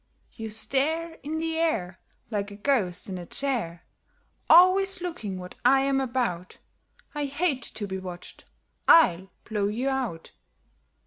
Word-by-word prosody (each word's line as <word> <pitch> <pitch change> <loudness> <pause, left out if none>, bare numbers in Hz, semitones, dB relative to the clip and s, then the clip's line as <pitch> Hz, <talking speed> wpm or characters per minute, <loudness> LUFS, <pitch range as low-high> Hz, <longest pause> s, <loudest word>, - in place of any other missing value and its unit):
You 225 0 -6
stare 310 +9 -1
In 305 +3 -4
the 325 0 -1
air 190 - -1 0.3
Like 205 -1 -2
a 200 - -10
ghost 205 -6 0
in 185 -2 -5
a 175 - -7
chair, 230 -12 -3 0.6
Always 370 +3 +6
looking 275 - -5
what 180 0 -8
I 270 +2 +5
am 270 0 +1
about; 235 -9 -2 0.6
I 295 -1 -2
hate 285 -1 0
to 220 -3 -6
be 190 -1 -4
watched 180 -1 -9 0.4
I'll 190 - +6 0.2
blow 210 -3 -1
you 240 +6 -1
out." 250 -12 -3
245 Hz, 140 wpm, -26 LUFS, 190-300 Hz, 0.6 s, Always